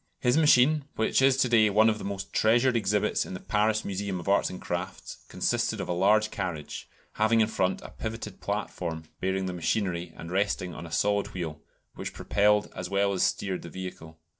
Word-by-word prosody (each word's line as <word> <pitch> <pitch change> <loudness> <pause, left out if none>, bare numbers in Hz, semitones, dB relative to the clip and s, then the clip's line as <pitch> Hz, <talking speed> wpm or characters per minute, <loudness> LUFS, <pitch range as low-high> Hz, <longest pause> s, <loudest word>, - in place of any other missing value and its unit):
His 125 0 +2
machine, 150 -1 +5
which 110 +4 +2
is 135 0 +5
to 130 - +3
day 110 -3 +5
one 110 +2 +5
of 110 -1 +1
the - - -7
most 100 -1 -5
treasured 120 +3 +3
exhibits 105 -2 +1
in 95 - -7
the - - -6
Paris 110 +2 0
Museum 100 -1 -3
of 85 - -9
Arts 100 +1 +3
and 90 - -7
Crafts, 90 +2 -5
consisted - - -1
of - - -3
a 90 - -1
large 105 +4 +3
carriage, 85 -7 -5 0.3
having 110 +1 +4
in 110 - +5
front 95 -4 -1
a - - -8
pivoted 110 -3 -6
platform 90 -5 -3 0.2
bearing 95 0 -1
the 90 - -3
machinery, 90 -1 -1
and 85 - -8
resting 95 -2 0
on 85 - -8
a - - -12
solid 100 +3 0
wheel, 80 -4 -5 0.3
which - - -6
propelled 105 0 +2
as 90 0 -5
well 100 0 +1
as 95 - -1
steered 95 -2 0
the 85 - -9
vehicle. 85 -3 -8
100 Hz, 200 wpm, -28 LUFS, 90-110 Hz, 0.3 s, machine